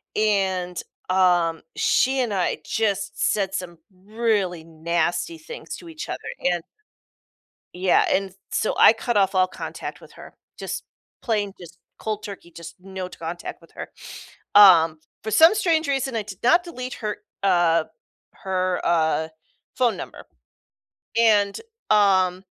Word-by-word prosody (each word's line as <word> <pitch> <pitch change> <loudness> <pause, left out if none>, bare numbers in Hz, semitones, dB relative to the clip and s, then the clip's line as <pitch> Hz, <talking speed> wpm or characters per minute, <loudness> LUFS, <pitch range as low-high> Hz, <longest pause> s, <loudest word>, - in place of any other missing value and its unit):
and, 190 -4 0 0.3
um, 175 -3 +3
she 265 +1 +2
and 235 -5 0
I 180 -4 0
just 200 -2 -1
said 195 -2 +1
some 175 -3 -5 0.2
really 200 -3 -1
nasty 170 - -2
things 475 +10 -8
to 340 - -12
each 320 -1 -8
other - - -4 0.2
and 175 -2 +1 1.1
yeah, 180 0 +3
and 195 0 +1
s - - -23 0.2
so - - 0
I - - +8
cut 235 +1 -3
off 195 -1 +3
all 185 0 +3
contact - - -7
with - - -16
her, - - -13 0.2
just - - -5 0.4
plain 205 -4 -1
just 170 0 -13 0.2
cold 215 -1 -4
turkey, 195 -4 -9
just 170 0 -10
no 190 -1 -6
t - - -13
contact 170 +1 -6
with - - -20
her. - - -7 0.7
Um, 165 -6 +7 0.2
for 220 - -4
some 325 - +7
strange 330 -6 +1
reason, 270 -3 -1
I 215 - -2
did 195 -3 -10
not 340 +8 +5
delete 255 -7 -6
her, 210 -2 -4 0.3
uh 175 -4 +3 0.6
her, 185 -1 -1
uh, 160 -1 +1 0.5
phone 245 -3 +2
number - - -9 0.9
and, 205 -3 +3 0.3
um, 190 -3 +3
195 Hz, 145 wpm, -23 LUFS, 175-220 Hz, 1.1 s, I